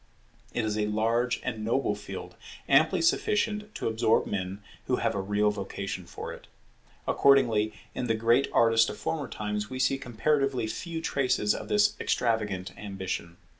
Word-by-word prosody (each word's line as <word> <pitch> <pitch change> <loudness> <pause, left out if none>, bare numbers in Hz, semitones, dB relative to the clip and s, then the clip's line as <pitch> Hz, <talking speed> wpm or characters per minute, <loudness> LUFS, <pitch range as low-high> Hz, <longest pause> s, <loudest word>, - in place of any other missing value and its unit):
It 120 - -1
is 110 0 -1
a 105 - +1
large 115 +3 +1
and 110 -4 -3
noble 120 +5 +1
field, - - -7 0.3
amply - - +4
sufficient 215 -8 +1
to - - -2
absorb 115 0 +2
men 95 +1 -4 0.2
who - - +2
have - - 0
a 100 - -1
real 105 +2 +2
vocation 100 -2 -5
for - - -6
it. - - -13 0.6
Accordingly, 115 -6 +4 0.2
in 125 - -3
the 115 - +2
great 115 +4 +3
artist 115 -1 +4
of - - -6
former 150 -5 -2
times 105 -1 -3
we 130 - -5
see 135 +1 +2
comparatively 135 +1 0
few 165 +8 -4
traces 130 -8 +1
of - - -6
this 210 0 +3
extravagant 105 -6 -1
ambition. 95 -4 -5
115 Hz, 160 wpm, -28 LUFS, 105-135 Hz, 0.6 s, amply